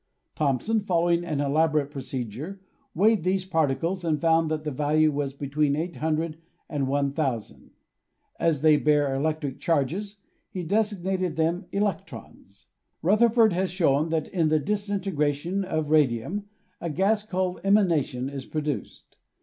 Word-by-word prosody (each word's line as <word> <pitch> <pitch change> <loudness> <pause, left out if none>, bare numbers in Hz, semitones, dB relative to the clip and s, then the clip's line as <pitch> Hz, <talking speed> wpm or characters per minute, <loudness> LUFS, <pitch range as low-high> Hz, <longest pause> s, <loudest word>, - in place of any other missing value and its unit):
Thomson, 150 - +1
following 175 -3 +1
an 155 -5 -2
elaborate 150 0 +1
procedure, 135 - -5 0.4
weighed 210 +1 +3
these 185 +1 0
particles 165 +2 0
and 155 -3 0
found 165 -1 +3
that 155 -1 -2
the 150 - -3
value 150 +3 +2
was 140 -1 -2
between 140 +1 0
800 160 0 -2 0.3
and 140 -3 -2
1,000. 140 -4 -2 0.7
As 155 -4 +1
they 155 -1 +6
bear 145 -2 +2
electric 145 0 -2
charges, 175 +6 -1 0.3
he 185 - -5
designated 190 -2 0
them 165 +4 0
electrons. 160 - -4 0.4
Rutherford 220 +3 +4
has 185 +1 0
shown 160 -4 +2
that 160 -1 -1
in 170 -4 +1
the 155 0 +3
disintegration 190 -2 -1
of 155 -5 -2
radium 155 - +1 0.3
a 170 - -3
gas, 195 +7 +2
called 185 -3 -2
emanation, 165 -10 +2
is 135 -1 -6
produced. 150 -3 -5
160 Hz, 130 wpm, -26 LUFS, 145-185 Hz, 0.7 s, they